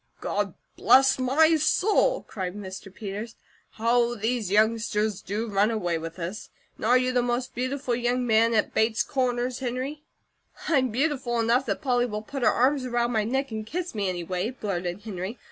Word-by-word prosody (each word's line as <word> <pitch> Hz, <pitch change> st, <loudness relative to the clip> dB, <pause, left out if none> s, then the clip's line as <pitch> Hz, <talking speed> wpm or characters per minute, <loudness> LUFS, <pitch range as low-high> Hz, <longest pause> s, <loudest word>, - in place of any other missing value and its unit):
"God -, -, -2 dB, 0.2 s
bless 265 Hz, 0 st, +5 dB
my 315 Hz, +6 st, +4 dB
soul!" 425 Hz, +10 st, +2 dB
cried 185 Hz, -2 st, -5 dB
Mr. 195 Hz, -1 st, -8 dB
Peters. 210 Hz, +3 st, -6 dB, 0.4 s
"How 235 Hz, +1 st, +2 dB
these 225 Hz, -1 st, -1 dB
youngsters 215 Hz, -1 st, +1 dB
to 210 Hz, +4 st, -3 dB
run 205 Hz, 0 st, +2 dB
away 175 Hz, -7 st, -1 dB
with 165 Hz, +1 st, -7 dB
us. 180 Hz, +4 st, -6 dB, 0.3 s
And -, -, -5 dB
are 250 Hz, +2 st, +6 dB
you 255 Hz, 0 st, +1 dB
the 250 Hz, -1 st, +2 dB
most 245 Hz, +1 st, -2 dB
beautiful 255 Hz, +1 st, -2 dB
young 245 Hz, +1 st, 0 dB
man 230 Hz, 0 st, +3 dB
at 215 Hz, -, +1 dB
Bates 220 Hz, 0 st, +2 dB
Corners, 250 Hz, -2 st, -1 dB
Henry?" 260 Hz, +4 st, -4 dB, 0.7 s
"I'm 265 Hz, -5 st, +2 dB
beautiful 250 Hz, -1 st, 0 dB
enough 235 Hz, +4 st, +2 dB
that -, -, -2 dB
Polly 245 Hz, -2 st, +2 dB
will 210 Hz, -2 st, -5 dB
put 275 Hz, +4 st, -6 dB
her -, -, +5 dB
arms 265 Hz, +2 st, +2 dB
around 240 Hz, -1 st, 0 dB
my 215 Hz, -3 st, +1 dB
neck 265 Hz, +3 st, -1 dB
and 220 Hz, -1 st, -4 dB
kiss 350 Hz, +10 st, -4 dB
me, 205 Hz, -3 st, -1 dB
anyway," 180 Hz, +3 st, -2 dB
blurted 185 Hz, -6 st, -4 dB
Henry. 205 Hz, +1 st, -5 dB
235 Hz, 175 wpm, -26 LUFS, 210-255 Hz, 0.7 s, are